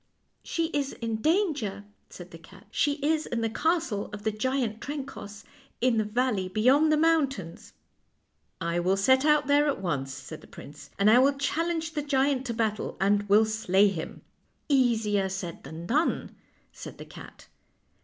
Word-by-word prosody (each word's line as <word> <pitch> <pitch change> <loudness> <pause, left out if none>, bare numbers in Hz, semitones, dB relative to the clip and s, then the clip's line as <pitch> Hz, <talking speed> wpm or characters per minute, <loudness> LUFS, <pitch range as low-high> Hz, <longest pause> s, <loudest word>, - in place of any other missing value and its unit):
" - - -46
" - - -45
She 330 -1 0
is 285 -3 -2
in 225 -1 -3
danger," 290 - 0 0.2
said 175 0 -11
the 165 - -11
cat. 185 +3 -17
" - - -37
She 290 - +1
is 310 0 +1
in 235 -1 -2
the 225 -1 -1
castle 315 - -1
of 205 0 -8
the 220 - 0
giant 225 0 -2
Trencoss, 270 -8 -7 0.4
in 245 -2 +2
the 215 - +2
valley 210 -3 -1
beyond 260 +10 +3
the 305 - +3
mountains." 280 - 0 0.4
" - - -47
I 170 +1 -1
will 185 +3 +1
set 260 +7 +3
out 300 -1 +4
there 290 +2 +3
at 285 - -1
once," 140 -8 -2
said 145 +3 -9
the - - -16
prince, 145 - -12
" - - -33
and 200 - +2
I 225 +3 +7
will 275 +2 +4
challenge 325 +3 -1
the 300 - -1
giant 275 -2 0
to 235 - -2
battle, 220 -2 -2
and 205 +1 +1
will 210 +2 +6
slay 210 -2 +2
him." 165 -5 -6 0.2
" - - -44
Easier 225 -8 +2
said 185 -3 -6
than 160 +4 -8
done," 295 - 0 0.4
said - - -10
the - - -9
cat. - - -13
225 Hz, 190 wpm, -27 LUFS, 200-285 Hz, 0.4 s, I